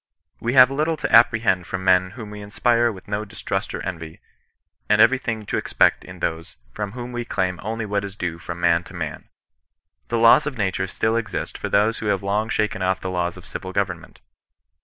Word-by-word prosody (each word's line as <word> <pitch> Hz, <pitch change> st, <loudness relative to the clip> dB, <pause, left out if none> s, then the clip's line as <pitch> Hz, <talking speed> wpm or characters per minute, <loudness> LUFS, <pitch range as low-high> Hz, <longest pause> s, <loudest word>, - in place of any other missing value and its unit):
We 120 Hz, +1 st, -1 dB
have 130 Hz, 0 st, +8 dB
little 155 Hz, +3 st, 0 dB
to -, -, +2 dB
apprehend 115 Hz, -6 st, +4 dB
from 95 Hz, 0 st, -4 dB
men 95 Hz, 0 st, +4 dB
whom 110 Hz, -3 st, -8 dB
we 105 Hz, 0 st, -8 dB
inspire 120 Hz, +3 st, +2 dB
with 95 Hz, -3 st, -12 dB
no 105 Hz, +1 st, -2 dB
distrust 100 Hz, -2 st, -4 dB
or -, -, -6 dB
envy, 80 Hz, -4 st, -6 dB, 0.7 s
and -, -, +4 dB
everything 115 Hz, -4 st, +3 dB
to -, -, -2 dB
expect -, -, +2 dB
in -, -, -11 dB
those 80 Hz, 0 st, -3 dB, 0.2 s
&om 105 Hz, -1 st, -3 dB
whom 125 Hz, 0 st, -6 dB
we 120 Hz, 0 st, -3 dB
claim 95 Hz, -6 st, -2 dB
only 110 Hz, +2 st, -3 dB
what 100 Hz, -1 st, -1 dB
is 100 Hz, -1 st, -7 dB
due 85 Hz, -4 st, -4 dB
from 85 Hz, 0 st, -7 dB
man 85 Hz, 0 st, +3 dB
to -, -, -12 dB
man. -, -, -6 dB, 0.8 s
The 115 Hz, -, -1 dB
laws 115 Hz, +6 st, +6 dB
of 140 Hz, -4 st, -4 dB
nature 95 Hz, -2 st, -1 dB
still 110 Hz, +4 st, 0 dB
exist 115 Hz, -3 st, -3 dB
for -, -, -4 dB
those 105 Hz, +3 st, +2 dB
who 110 Hz, -, -4 dB
have 100 Hz, -2 st, 0 dB
long 105 Hz, +3 st, 0 dB
shaken 105 Hz, -3 st, -1 dB
off 95 Hz, 0 st, +1 dB
the 95 Hz, -, -4 dB
laws 90 Hz, -1 st, -2 dB
of -, -, -13 dB
civil 95 Hz, 0 st, -7 dB
government. 90 Hz, -4 st, -3 dB
105 Hz, 205 wpm, -22 LUFS, 95-115 Hz, 0.8 s, have